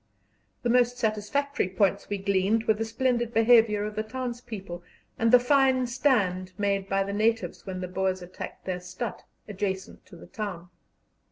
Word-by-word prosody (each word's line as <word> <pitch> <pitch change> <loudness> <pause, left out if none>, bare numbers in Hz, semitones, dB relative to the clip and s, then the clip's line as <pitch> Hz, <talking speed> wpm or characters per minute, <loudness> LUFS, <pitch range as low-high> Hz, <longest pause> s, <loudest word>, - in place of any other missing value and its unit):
The 240 - +1
most 245 0 +3
satisfactory 225 +3 -1
points 195 +1 +1
we 205 - -1
gleaned 200 +3 +1
were 220 - +3
the 225 +1 -3
splendid 240 0 0
behaviour 225 -2 +5
of 210 - -4
the 215 - 0
townspeople, 220 -6 -6 0.4
and 230 0 +3
the 250 - +10
fine 260 0 +3
stand 205 -8 +1
made 200 -1 0
by 195 0 +2
the 200 +1 -4
natives 225 +1 0
when 185 -1 -4
the 180 - -3
Boers 185 0 -1
attacked 180 +1 -9
their 185 -1 -2
stadt, 180 +4 -6 0.3
adjacent 190 -2 -4
to - - -13
the 170 - -12
town. 180 -2 -6
210 Hz, 165 wpm, -27 LUFS, 190-240 Hz, 0.4 s, the